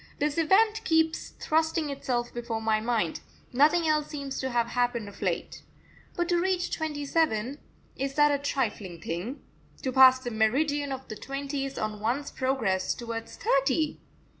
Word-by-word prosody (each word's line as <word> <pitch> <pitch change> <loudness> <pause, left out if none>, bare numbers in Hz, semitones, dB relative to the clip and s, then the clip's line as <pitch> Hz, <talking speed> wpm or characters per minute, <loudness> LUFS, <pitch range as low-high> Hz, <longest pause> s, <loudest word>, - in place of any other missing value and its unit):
This 295 +2 0
event 430 +7 +3
keeps 320 -5 +1
thrusting 320 -1 +1
itself 245 -3 -2
before 235 -2 -3
my 220 -1 +1
mind 225 -7 0 0.3
nothing 310 +6 +4
else 305 -1 +2
seems 280 -3 -5
to 265 - -2
have 240 -2 +1
happened 245 -3 0
of 200 - -12
late. - - -2 0.5
But 345 -1 0
to 345 -1 +3
reach 370 -1 0
twenty 300 -3 -3
seven 275 -4 0 0.4
is 275 +1 -3
that 295 0 +5
a 285 - +1
trifling 215 - -2
thing? 175 - -5 0.4
to 260 - 0
pass 260 0 +8
the 255 -2 -6
meridian 280 +6 +1
of 265 0 -5
the 215 - -6
twenties 275 +2 -4
on 215 -1 -3
one's 250 +7 -1
progress 235 -8 0
towards 230 -1 -6
thirty? 275 +3 +1
270 Hz, 160 wpm, -28 LUFS, 235-300 Hz, 0.5 s, pass